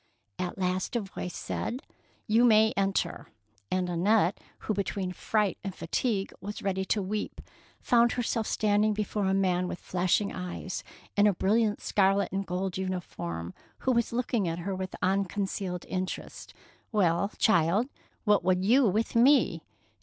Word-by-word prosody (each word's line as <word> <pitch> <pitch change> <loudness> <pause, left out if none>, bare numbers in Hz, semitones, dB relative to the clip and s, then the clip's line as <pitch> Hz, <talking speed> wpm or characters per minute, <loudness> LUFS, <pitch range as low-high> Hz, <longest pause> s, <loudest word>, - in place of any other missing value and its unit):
At 180 -1 -3
last 185 +3 -1
a 235 - +2
voice 185 -3 -6
said, 250 +3 -4
— - - -36
'' - - -39
You 235 - +6
may 220 -2 +5
enter''; 195 -1 -1 0.4
and 185 -1 0
Annette, 180 +2 +2 0.2
who 215 - -1
between 195 -1 -2
fright 210 +1 0
and 195 -2 -5
fatigue 195 +3 -1
was 205 +1 -6
ready 190 -1 0
to 205 +1 0
weep, 210 +3 -3 0.4
found 240 0 +3
herself 230 -2 -1
standing 210 0 +2
before 210 -1 -1
a 190 0 +2
man 180 -2 +1
with 180 - -4
flashing 185 +3 0
eyes 180 0 -5 0.3
and 205 0 +5
a 205 - +4
bril 200 +5 +2
liant 215 -2 0
scarlet 195 -1 +2
and 195 +1 -2
gold 185 +1 -2
uniform, 90 - -4 0.2
who 260 - 0
was 235 -2 +1
looking 235 -4 0
at 165 0 -2
her 185 +3 -3
with 185 0 -4
unconcealed 190 -1 -1
interest. 185 -1 -5 0.4
''Well, 200 -2 +1
child, 185 +4 +3 0.4
what 210 -4 +3
would 185 +1 +2
you 250 +4 +5
with 215 +5 0
me? 240 - +4
195 Hz, 160 wpm, -29 LUFS, 185-215 Hz, 0.4 s, You